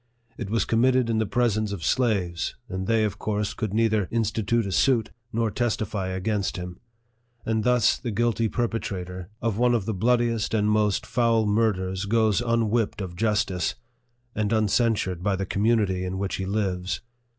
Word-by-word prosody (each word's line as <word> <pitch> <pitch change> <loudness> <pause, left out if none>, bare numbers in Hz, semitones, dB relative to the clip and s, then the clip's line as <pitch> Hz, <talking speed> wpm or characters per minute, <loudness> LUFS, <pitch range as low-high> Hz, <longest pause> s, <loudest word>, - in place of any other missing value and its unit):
It 100 - -6
was 115 +2 +1
committed 125 +1 +2
in 110 - +1
the 110 - 0
presence 110 -2 +1
of 90 -6 -4
slaves, 95 - 0
and 95 0 -4
they 115 -1 +3
of 105 -1 -2
course 105 0 -1
could 110 -4 -3
neither 110 -2 +2
institute 115 0 0
a 100 - -3
suit, 115 +3 +2 0.2
nor 115 -2 0
testify 105 -5 -1
against 95 +2 -1
him; 90 0 -7 0.7
and 110 -1 0
thus 125 -3 +3
the 120 - -4
guilty 115 +1 +1
perpetrator 95 -7 -3
of 115 -2 0
one 120 0 +4
of 110 -5 -1
the 110 - -1
24 95 +5 -2
NARRATIVE 125 -1 +4
OF - - +1
THE - - +2
bloodiest 115 -2 -2
and 105 0 +2
most 105 -2 +1
foul 115 -1 +2
murders 100 -3 0
goes 110 0 +2
unwhipped 115 -2 0
of 90 -3 -5
justice, 105 -4 0 0.6
and 105 -1 -1
uncensured 110 -4 +1
by 100 +1 +1
the 95 +1 -2
community 100 -2 +1
in 95 +1 -3
which 95 0 -2
he 95 - -3
lives. 95 -3 -1
110 Hz, 180 wpm, -25 LUFS, 95-115 Hz, 0.7 s, one